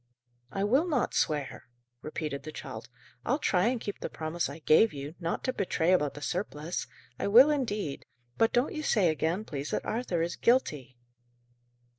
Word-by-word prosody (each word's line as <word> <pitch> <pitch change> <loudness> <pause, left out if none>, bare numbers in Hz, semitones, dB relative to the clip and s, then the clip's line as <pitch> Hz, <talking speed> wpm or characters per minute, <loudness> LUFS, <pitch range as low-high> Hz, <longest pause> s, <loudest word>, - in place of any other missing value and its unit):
"I 195 - -2
will 265 - +3
not 285 -8 0
swear," 145 -4 -1 0.4
repeated 150 -2 -4
the 155 +3 -8
child. 120 -7 -8 0.3
"I'll 265 - +1
try 190 -8 +2
and 245 0 0
keep 205 -2 -5
the - - -4
promise 160 +1 -3
I 140 - -7
gave 165 +7 +4
you, 140 +2 -6
not 170 -1 -2
to 255 - -1
betray 180 -3 +1
about 150 -6 +1
the 145 - -8
surplice 175 -2 -3 0.3
I - - -1
will 250 +9 +8
indeed; 210 - -2 0.3
but 225 - +3
don't 245 +3 +1
you 310 - -3
say 210 - +3
again, 165 +6 -1
please, 140 -4 -5
that - - -2
Arthur 215 -8 -1
is 170 - -2
guilty." 150 - +1
175 Hz, 175 wpm, -29 LUFS, 150-225 Hz, 0.4 s, will